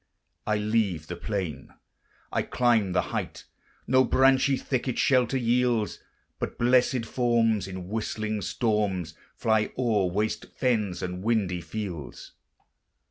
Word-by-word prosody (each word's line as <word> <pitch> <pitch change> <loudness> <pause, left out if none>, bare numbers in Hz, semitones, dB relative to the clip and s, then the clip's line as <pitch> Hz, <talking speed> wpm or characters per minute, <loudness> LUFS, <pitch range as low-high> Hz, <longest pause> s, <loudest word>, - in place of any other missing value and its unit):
I 105 0 +2
leave 105 -6 0
the 85 - -6
plain, 85 -7 -4 0.6
I - - +1
climb 115 -6 +2
the - - 0
height; - - -4 0.4
No 130 +1 +4
branchy 135 +1 +4
thicket 130 -1 -2
shelter 130 -1 +3
yields; 120 -2 +1 0.4
But - - -4
blessèd 125 0 +3
forms 115 -5 +1
in 95 -2 -7
whistling 110 0 -2
storms 100 -6 -1 0.2
Fly 110 -1 +1
o'er 110 -7 +2
waste 105 +4 -1
fens 110 -8 0
and 90 0 -4
windy 100 -5 0
fields. 90 -8 -6
110 Hz, 120 wpm, -27 LUFS, 95-120 Hz, 0.6 s, No